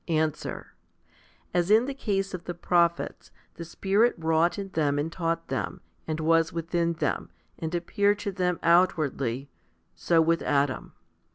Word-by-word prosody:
Answer. 155 -2 -2 0.8
As 175 0 +1
in 220 +3 +5
the 280 - -3
case 195 -7 -2
of 180 -1 -6
the 175 - -4
prophets, 170 0 0 0.2
the 170 - -8
Spirit 200 +7 +1
wrought 165 +2 +2
in 195 -1 -5
them 150 -5 0
and 150 +3 -1
taught 165 -1 -2
them, - - -3 0.3
and 155 0 -2
was 165 0 +3
within 170 0 -1
them, 155 -3 -2 0.3
and 160 +1 -3
appeared 200 +4 +1
to 200 - -1
them 180 -2 0
outwardly, 145 -7 +2 0.5
so 170 -1 +2
with 165 +1 +3
Adam. 140 -2 0
170 Hz, 150 wpm, -27 LUFS, 160-185 Hz, 0.8 s, in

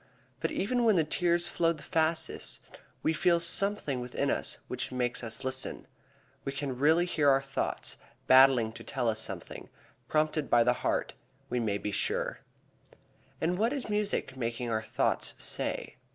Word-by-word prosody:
But - - 0
even 240 +5 0
when 220 -3 +5
the 165 - +4
tears 175 +2 +1
flow 165 -1 +1
the 150 - -12
fastest 160 0 -1 0.4
we 160 - +2
feel 170 +2 +3
something 170 -5 +2
within 125 0 -1
us - - -3
which 125 0 -4
makes 125 -1 -2
us 115 +3 -3
listen. 130 0 -2 0.6
We 135 - -3
can 140 -2 -3
really 160 +5 +4
hear 155 -5 +2
our 135 0 +5
thoughts 135 0 -2 0.3
battling 130 -3 +6
to - - -9
tell 130 -4 -2
us 110 -1 +1
something, - - -6 0.4
prompted 155 -1 +1
by 120 -1 +5
the 125 - +3
heart, - - 0 0.4
we 125 - +1
may 105 -3 0
be 105 - -4
sure. 100 - -1 1.0
And 175 +3 0
what 230 +5 +2
is 275 -6 -3
music 210 -10 -1
making 120 -1 -3
our 110 -1 0
thoughts - - -1
say? - - -3
140 Hz, 165 wpm, -30 LUFS, 125-170 Hz, 1.0 s, battling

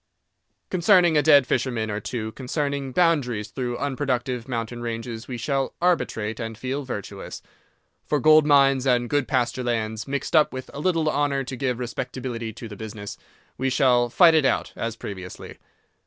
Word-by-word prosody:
Concerning 180 -2 +4
a 150 - +5
dead 145 -2 +6
fisherman 120 -4 -1
or 105 - -2
two, 110 0 -4
concerning 140 +2 -3
boundaries 130 - +1
through 125 -2 -3
unproductive 130 -3 -2
mountain 120 -1 -4
ranges 115 -1 -5
we 125 - -5
shall 135 +3 -1
arbitrate 115 -11 0
and 115 -2 -5
feel 130 +4 -3
virtuous. 120 -7 -7 0.6
For 150 - +1
gold 155 +3 +6
mines 135 -2 +4
and 120 -1 +2
good 145 0 0
pasture 130 -1 0
lands, 110 -1 -2
mixed 140 +3 -2
up 155 -1 +4
with 130 0 -7
a - - -6
little 165 -1 +1
honour 145 -2 +1
to 130 0 -6
give 125 -1 -1
respectability 125 -1 -4
to 115 +1 -9
the 105 - -9
business, 105 -1 -7 0.4
we 135 - +1
shall 125 -2 +3
fight 165 +6 +6
it 155 -2 +4
out, 135 - 0
as 115 -1 -3
previously. 95 -5 -8
130 Hz, 165 wpm, -24 LUFS, 115-140 Hz, 0.6 s, dead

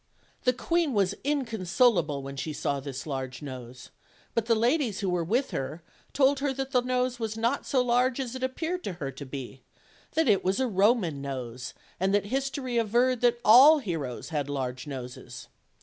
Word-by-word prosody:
The 250 - +4
queen 335 +2 0
was 200 -1 +2
inconsolable 220 - +1
when 135 0 -7
she 155 +3 -4
saw 140 -1 -1
this 135 -1 -6
large 130 -1 -5
nose; 125 -3 -9 0.4
but 230 -1 0
the 230 - +4
ladies 235 -2 +1
who 195 - 0
were 175 -1 0
with 240 +11 0
her 155 +5 -4 0.3
told 275 0 +3
her 280 0 0
that 270 0 -4
the 250 -3 +3
nose 250 0 -1
was 220 -1 -3
not 235 +5 0
so 255 -2 +2
large 250 +1 +2
as 255 -3 -3
it 260 - -6
appeared 320 +8 -2
to 195 - -3
her 145 -6 -5
to 135 +2 -9
be; 130 -1 -7 0.5
that 320 -2 +2
it 205 -4 +3
was 190 +4 +1
a 260 - +2
Roman 195 - +2
nose, 125 -2 -6 0.2
and 190 +2 +2
that 205 - +1
history 260 0 -1
averred 240 +3 +2
that 240 -1 +3
all 270 +8 +9
heroes 165 - -4
had 145 -4 -2
large 130 -1 -3
noses. 125 -3 -8
215 Hz, 185 wpm, -28 LUFS, -, 0.5 s, all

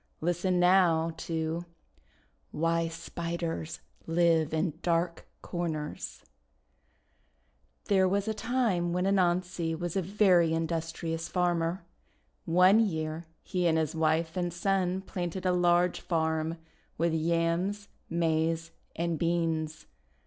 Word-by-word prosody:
Listen 175 +2 0
now 175 -3 +4
to 160 0 -3 0.9
WHY 165 +1 0
SPIDERS 165 0 -4 0.3
LIVE 165 -2 +3
IN 160 +1 0
DARK 170 0 0 0.2
CORNERS 160 -4 -4 1.6
THERE 190 -2 +3
was 200 +2 0
a 220 - 0
time 215 -8 0
when 180 +1 0
Anansi 180 -3 +1
was 175 +1 -4
a 195 - +2
very 180 -3 +3
in 165 0 0
dustrious 165 0 -3
farmer. 175 0 0 0.6
One 180 +5 +5
year 160 -5 -1 0.2
he 180 -2 0
and 160 -1 +3
his 160 -1 0
wife 160 +1 +1
and 175 -1 -1
son 185 +1 0
planted 180 -1 -4
a 185 - +3
large 175 0 +3
farm 160 -1 -1 0.4
with 170 0 +1
Yams, 170 +5 0 0.2
Maize, 165 0 0 0.2
and 170 -1 -1
Beans. 165 -2 -1
170 Hz, 115 wpm, -29 LUFS, 165-180 Hz, 1.6 s, One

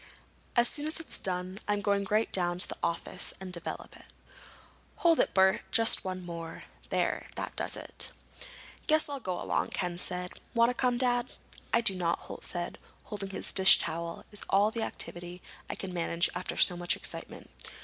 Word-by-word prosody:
"As 240 -1 +5
soon 295 +4 0
as 315 - -2
it's 325 - -4
done 185 +1 0
I'm 205 0 +1
going 200 -1 +1
right 215 +2 +2
down 175 -2 +2
to 180 - +4
the - - -6
office 170 - -1
and 190 -1 -7
develop 170 -1 -6
it. - - -15 0.8
Hold 335 -2 +4
it, - - +2
Bert. 190 0 +5
Just 225 -1 +5
one 185 -1 -4
more. 170 -1 -7 0.3
There, - - 0
that - - -5
does - - -1
it." - - +1 0.8
"Guess 310 -1 +4
I'll 285 -1 -4
go 185 -7 -3
along," - - 0
Ken 175 -1 -2
said. 180 0 -2 0.2
"Want 235 +1 +5
to - - -4
come, 250 -1 +1
Dad?" 245 -1 +1 0.4
"I 235 - +4
do 230 -4 +3
not," 175 -2 0
Holt - - -9
said. 175 -1 -3 0.2
"Holding 205 -2 -5
this 195 - -1
dish 190 0 +8
towel 170 +1 -4
is 210 - -6
all 205 +2 +4
the 230 - -3
activity 175 -4 -4 0.3
I - - -3
can 190 -2 -6
manage 170 0 +1
after 180 - -4
so 180 - +6
much 175 0 0
excitement. - - -5
190 Hz, 185 wpm, -30 LUFS, 175-230 Hz, 0.8 s, dish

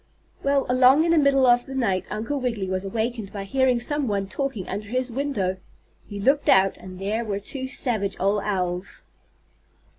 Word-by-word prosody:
Well, 275 0 +1
along 255 +5 +5
in 335 - +2
the 335 - +5
middle 275 -2 +4
of 245 0 +4
the 265 - -7
night 195 -8 0
Uncle 225 +7 -3
Wiggily 230 -7 -2
was 185 0 -2
awakened 220 +1 -3
by 200 -1 -5
hearing 255 +3 +2
some 290 +3 0
one 200 -2 -1
talking 270 -4 -4
under 205 +2 -5
his 255 +1 -1
window. 230 -8 -1 0.5
He 205 - -7
looked 275 +8 +2
out, 195 0 +5
and 185 -1 -10
there 210 +5 -2
were 205 -3 -3
two 260 +6 -5
savage 220 -7 -1
old 200 +2 +1
owls. 180 -2 -3
225 Hz, 180 wpm, -24 LUFS, 195-265 Hz, 0.5 s, along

